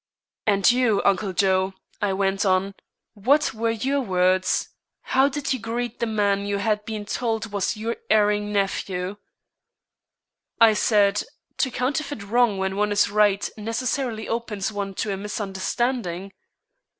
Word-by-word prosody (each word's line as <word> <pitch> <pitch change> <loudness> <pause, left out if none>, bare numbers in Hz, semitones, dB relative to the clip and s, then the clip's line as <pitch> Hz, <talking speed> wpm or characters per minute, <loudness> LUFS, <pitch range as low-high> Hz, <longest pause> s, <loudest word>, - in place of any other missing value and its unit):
"And 200 +2 +5
you, 240 -5 +2
Uncle 200 0 +2
Joe," 190 +1 +1 0.3
I 205 -1 +1
went 195 +1 0
on; 190 0 +1 0.4
"what 265 +8 +2
were 230 +1 -1
your 265 +5 0
words? 185 -3 +1 0.3
How 265 +2 +3
did 285 0 -2
you 260 - -3
greet 235 +2 -4
the 235 - 0
man 200 -2 +1
you 200 0 0
had 210 +1 0
been 215 -1 -5
told 225 0 -2
was 205 +2 -1
your 225 +2 -3
erring 210 -1 +3
nephew?" 195 -1 -1 1.4
"I 225 -2 +7
said: 205 -2 +3 0.4
'To 265 - +1
counterfeit 275 -1 -2
wrong 225 0 +2
when 190 0 -2
one 210 0 +1
is 205 -1 +2
right, 205 -1 +3
necessarily 230 +1 -2
opens 220 -3 -2
one 200 -2 -4
to 205 +1 -2
a - - -3
misunderstanding.'" 195 -1 -3
210 Hz, 140 wpm, -24 LUFS, 195-230 Hz, 1.4 s, I